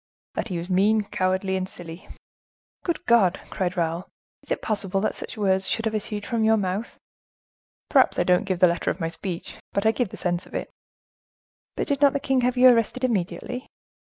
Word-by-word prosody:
"That - - -3
he 185 -5 -3
was 170 +1 -5
mean, 205 +4 +3
cowardly, 190 0 0
and 185 0 -2
silly." 170 0 -10 0.8
"Good 340 - -2
God!" 200 -7 +4
cried 180 0 -2
Raoul, 170 +1 -1 0.3
"is - - -20
it - - -2
possible 200 -3 -1
that 215 - 0
such - - -8
words 190 -2 +2
should 225 - -1
have 220 - 0
issued 210 -1 -3
from 230 -3 0
your 220 0 +4
mouth?" 195 +3 -3 0.9
"Perhaps - - +4
I - - +3
don't 180 +2 +3
give 190 -2 -1
the 180 - +6
letter 170 0 0
of - - -2
my 165 -2 -1
speech, 175 0 -6 0.2
but 200 - 0
I 220 - +6
give 240 -2 -1
the - - -9
sense 175 0 -2
of - - -12
it." - - -4 1.0
"But - - -1
did 285 -1 -1
not 285 -1 +6
the 280 - 0
king 265 -1 +1
have 250 +1 +1
you 255 +1 +8
arrested 245 +1 +2
immediately?" 240 +3 -2
200 Hz, 205 wpm, -25 LUFS, 180-230 Hz, 1.0 s, you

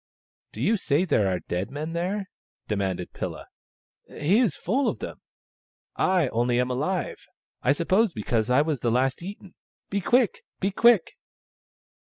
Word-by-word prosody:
" - - -67
Do - - -7
you 225 - +3
say 160 -1 +1
there 110 - +2
are 90 - -2
dead 90 +2 -3
men 155 +4 -5
there? 190 +4 -2 0.2
" - - -59
demanded 95 -4 -2
Pilla. - - -5 0.6
"He 180 +9 +1
is 230 -11 +2
full 260 +10 0
of - - 0
them. - - -7 0.7
I 180 -6 +2
only 120 +1 +1
am 125 0 +1
alive, 165 +8 -2 0.3
I 130 - +3
sup 170 +3 -4
pose 210 +2 +4
because 110 -2 -1
I 130 +4 +5
was 150 -4 -1
the 120 - 0
last 130 +4 +1
eaten. 195 0 -9 0.4
Be 200 0 0
quick! 240 +1 +2 0.2
be 195 - 0
quick 225 -3 +4
160 Hz, 170 wpm, -26 LUFS, 125-195 Hz, 0.7 s, I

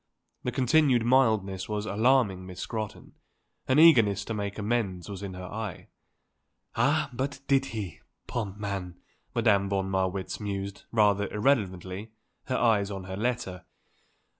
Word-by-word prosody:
The - - -2
continued 130 -2 +3
mildness 110 -8 +2
was 105 0 -2
alarming 110 -4 +2
Miss 90 -1 -9
Scrotton; 110 -3 -5 0.5
an 130 - +3
eagerness 115 - +6
to 115 - -3
make 100 -1 -3
amends 105 -5 -1
was 100 -2 -7
in 95 -2 -6
her 90 0 -7
eye. 105 0 -6 0.9
"Ah - - +2
but 135 +3 -3
did 135 -1 +3
he, 105 - -6 0.3
poor 120 -3 -2
man!" 95 -4 -5 0.4
Madame 105 -4 +3
von 95 -1 -1
Marwitz 95 0 -1
mused, 100 -2 -5
rather 105 -2 +3
irrelevantly, 105 -3 0 0.3
her 130 - -1
eyes 105 -4 +3
on 95 -2 -5
her 95 0 -6
letter. 100 -5 -2
105 Hz, 140 wpm, -28 LUFS, 95-120 Hz, 0.9 s, eagerness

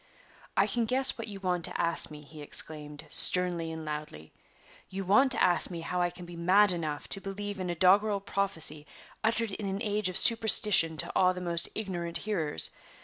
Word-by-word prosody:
"I - - +3
can 235 -1 -2
guess 260 +4 +4
what 230 - -8
you 200 -2 -9
want 180 -3 -3
to - - -6
ask 170 0 +1
me," 150 -1 -12
he 150 +1 -13
exclaimed, 150 0 -5
sternly 175 -3 +2
and 160 -1 -8
loudly; 150 - -8 0.6
"you 195 0 -6
want 235 +8 +3
to - - -1
ask 175 - +4
me 170 -2 -7
how 180 +2 -4
I 175 - 0
can 175 0 -11
be 175 0 -12
mad 185 +4 +3
enough 155 -4 -5
to 195 - -4
believe 200 +1 -7
in 185 -1 -5
a 175 - -3
doggerel 200 +4 +2
prophecy 165 -7 0 0.4
uttered 225 0 -1
in 200 +1 -6
an 195 +1 -4
age 210 -2 -2
of 185 - -2
superstition 210 -7 +6
to 135 - -4
awe 185 0 +2
the 180 - -8
most 170 -1 -2
ignorant 175 -5 -5
hearers. 170 - -2
180 Hz, 200 wpm, -28 LUFS, 165-205 Hz, 0.6 s, superstition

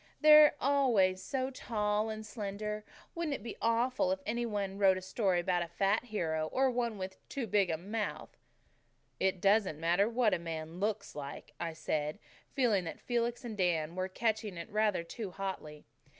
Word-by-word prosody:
"They're 305 -1 +8
always 235 -10 +3
so 265 -1 -2
tall 210 -3 -1
and 215 0 -5
slender. 210 -1 -4 0.3
Wouldn't 330 -4 -2
it - - -9
be 230 - -6
awful 230 0 +2
funny 185 - +2
if - - -24
any 235 +2 0
one 200 -2 -3
wrote 190 -2 +5
a - - -2
story 190 -2 +1
about 175 0 +1
a 170 - -2
fat 195 +7 +1
hero 160 -8 -1
or 265 +10 +1
about 255 -2 +1
one 235 -3 -1
with 190 0 -8
too 275 -4 -3
big 200 -3 +2
a 160 - 0
mouth?" 210 +5 -4 0.8
"It 190 -1 +1
doesn't 195 -5 +3
matter 175 +6 +2
what 235 -2 +2
a - - +1
man 165 0 -6
LOOKS 210 0 -2
like," 140 -1 -8
I 170 -1 -3
said, 155 -1 -2 0.4
feeling 230 -8 +3
that 165 - -6
Felix 240 +1 -1
and 225 -3 -5
Dan 170 -4 0
were 185 0 -1
catching 215 -2 -1
it 170 +6 -7
rather 210 -4 +1
too 205 +4 -6
hotly. 180 -6 -6
205 Hz, 185 wpm, -32 LUFS, 180-230 Hz, 0.8 s, They're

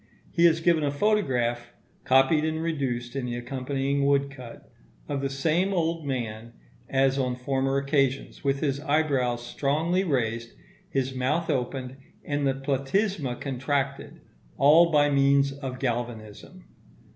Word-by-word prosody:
He 170 0 +3
has 165 -1 +4
given 165 -2 +3
a 145 - +1
photograph 125 - 0 0.3
(copied 135 +4 +4
and 160 0 -1
reduced 130 -6 -2
in 130 -2 -2
the 120 - -3
accompanying 135 +3 -2
woodcut) 140 -3 -1 0.4
of 140 -1 -2
the 135 - -1
same 160 +8 0
old 165 -3 -1
man 115 -3 -4 0.4
as 135 0 +2
on 125 -2 0
former 135 +1 -1
occasions, 140 -1 0
with 140 0 0
his 140 -2 0
eyebrows 140 -5 0
strongly 160 +9 0
raised, 115 -7 -1 0.4
his 130 -1 -1
mouth 135 +6 0
opened, 130 -1 -3 0.3
and 145 -1 0
the 135 - +1
platysma 135 - -1
contracted, 135 +1 -3 0.4
all 160 +4 +6
by 145 -2 +4
means 140 0 +3
of 135 -2 -6
galvanism. 115 - -5
135 Hz, 135 wpm, -26 LUFS, 125-150 Hz, 0.4 s, all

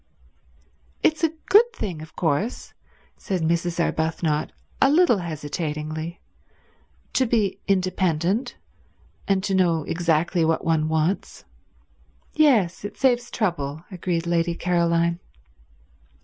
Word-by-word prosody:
"It's 315 +1 +2
a 325 - +4 0.2
good 465 +4 +6
thing, 180 - -5
of 155 0 -12
course," 175 - -1 0.4
said 185 -4 -3
Mrs. 170 +1 0
Arbuthnot 160 -2 0 0.3
a 270 - +6
little 305 - +4
hesitatingly, 155 0 -4 0.9
"to 260 - +2
be 215 -4 +1
independent, 185 - 0 0.7
and 195 -1 +1
to 195 - -1
know 170 -4 +2
exactly 170 +1 +1
what 160 0 0
one 160 -1 +1
wants." 160 +4 -1 0.9
"Yes, 235 - +3
it 205 - -7
saves 245 -2 +2
trouble," 160 - -2
agreed 175 -2 -2
Lady 170 0 0
Caroline. 170 -1 +1
170 Hz, 105 wpm, -24 LUFS, 160-200 Hz, 0.9 s, good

